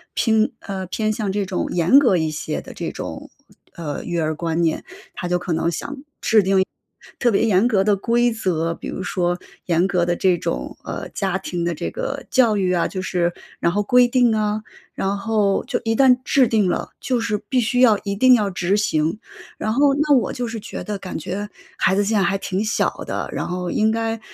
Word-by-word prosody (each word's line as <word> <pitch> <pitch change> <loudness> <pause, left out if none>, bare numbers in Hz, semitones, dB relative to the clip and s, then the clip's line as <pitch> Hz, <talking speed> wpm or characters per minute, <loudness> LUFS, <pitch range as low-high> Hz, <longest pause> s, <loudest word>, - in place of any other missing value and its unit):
乒 220 -1 +2
呃， 190 -2 -5
偏 215 +4 -1
向 210 -2 -2
这 200 0 -1
种 185 -1 -2
严 175 +11 +5
格 240 -10 +3
一 160 -2 0
些 155 -1 -3
的 - - -10
这 - - -4
种， - - -7 0.5
呃， 150 -4 -5
育 175 - -3
儿 155 -1 0
观 165 +1 -2
念， 160 -1 0 0.3
他 180 - -5
就 180 0 +1
可 175 -1 -3
能 165 +1 +1
想 170 - -4
制 - - -6
定 275 - -13 1.1
特 240 - +3
别 200 - +2
严 205 -1 +3
格 195 -4 +2
的 210 -1 +4
规 235 +4 +1
则， 170 -6 -1
比 - - -7
如 - - -5
说 175 -2 -1 0.3
严 175 +1 +2
格 180 -3 +1
的 175 - +1
这 185 -2 +3
种， - - -4
呃， - - -5
家 190 -2 -1
庭 180 -2 -4
的 170 0 0
这 150 - -4
个 275 -1 -4
教 230 -5 +3
育 185 -2 +1
啊 175 - +1
就 190 - -3
是 175 -2 0 0.3
然 170 - +2
后 205 +4 +1
规 245 +4 +5
定 240 -2 +3
啊， 215 0 0 0.3
然 195 +1 -1
后 205 -1 +1
就 265 - -2
一 225 0 +1
旦 255 0 +5
制 270 -2 +4
定 220 -4 +2
了， 180 - -1
就 250 -3 -1
是 220 -2 0
必 255 +3 +2
须 245 +2 0
要 235 -5 +6
一 200 - -2
定 255 +6 +5
要 210 -5 +3
执 180 +1 0
行。 165 -3 0 0.4
然 215 - -2
后 280 +2 +4
那 295 +1 +2
我 245 - -1
就 250 - -3
是 225 0 -5
觉 - - -7
得 210 -1 -4
感 190 -1 -6
觉 195 +6 -4 0.3
孩 190 - +2
子 205 - +2
现 215 +2 +1
在 - - +3
还 195 0 +1
挺 195 0 -2
小 220 - +1 0.2
的， - - -3
然 - - -3
后 180 0 -3
应 215 0 +2
该 225 0 -1
200 Hz, 235 characters per minute, -21 LUFS, 180-225 Hz, 1.1 s, 要